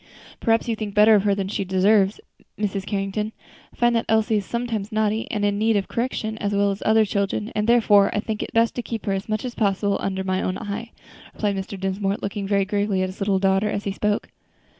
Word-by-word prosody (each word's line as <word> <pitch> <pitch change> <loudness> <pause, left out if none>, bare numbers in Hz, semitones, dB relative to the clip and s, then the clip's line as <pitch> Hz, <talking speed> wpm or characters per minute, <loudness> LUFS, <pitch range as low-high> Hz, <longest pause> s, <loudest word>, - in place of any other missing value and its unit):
"Perhaps 225 0 +1
you 230 - 0
think 215 -2 -5
better 210 +1 +7
of 205 -1 +4
her 200 -1 +3
than 195 -1 -2
she 200 0 -2
deserves, 195 +2 +3 0.4
Mrs. 200 -2 -2
Carrington. 205 +2 -2 0.4
I - - -21
find 240 0 +2
that 230 - 0
Elsie 220 0 +3
is 200 - -2
sometimes 235 -3 -3
naughty 215 0 0
and 205 -2 -1
in 205 0 0
need 220 +1 +2
of 195 - -2
correction, 225 -2 -3
as 205 0 -1
well 200 0 +3
as 195 - -5
other 220 0 +4
children, 200 +2 -2
and 210 +2 0
therefore, 210 -4 +5
I - - -1
think 215 0 -3
it - - -5
best 230 0 +2
to - - 0
keep 230 -2 -6
her 195 - 0
as 195 +3 -4
much 215 +2 -1
as 245 - -4
possible 200 -2 0
under 190 -1 -2
my 185 0 -1
own 185 - -2
eye," 215 +2 -5 0.5
replied 205 -2 0
Mr. 195 0 -5
Dinsmore, 195 +1 -1
looking 200 0 -4
very 200 -1 +2
gravely 200 -1 0
at 185 - -1
his 185 - -11
little 195 -1 +2
daughter 195 +2 +2
as 205 - -2
he 200 - -2
spoke. 210 +1 -1
205 Hz, 235 wpm, -23 LUFS, 195-220 Hz, 0.5 s, better